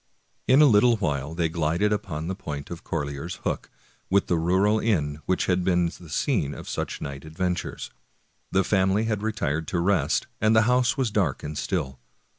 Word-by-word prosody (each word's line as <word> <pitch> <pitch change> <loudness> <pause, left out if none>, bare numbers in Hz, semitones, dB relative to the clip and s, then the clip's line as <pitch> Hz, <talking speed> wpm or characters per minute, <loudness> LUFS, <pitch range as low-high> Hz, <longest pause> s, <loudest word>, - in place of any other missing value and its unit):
In 135 +4 +6
a - - +8
little 115 -1 +5
while 75 -5 -2
they 85 -1 +1
glided 85 +5 0
by 80 -8 -5
the 85 +4 -3
point 75 -6 -6
of 85 - -7
Corlear's 70 +5 -4
Hook, - - -2 0.4
with 100 +1 +3
the 85 - +1
rural 95 +6 +2
inn 75 -10 0
which 95 - +1
had 90 -1 +1
been 90 -1 +2
the 85 - -13
scene 75 - 0
of - - -9
such - - -4
night 70 -1 -6
adventures. 90 +3 -3 0.6
The 95 0 +3
family 95 +2 +2
had 105 -2 -1
retired 85 -8 -2
to 85 - -1
rest, 95 +2 +1 0.2
and 110 +1 +4
the 110 - +6
house 125 +2 +2
was 130 -5 0
dark 95 -10 0
and 75 +1 -5
still. 75 -8 -2
90 Hz, 185 wpm, -25 LUFS, 75-105 Hz, 0.6 s, a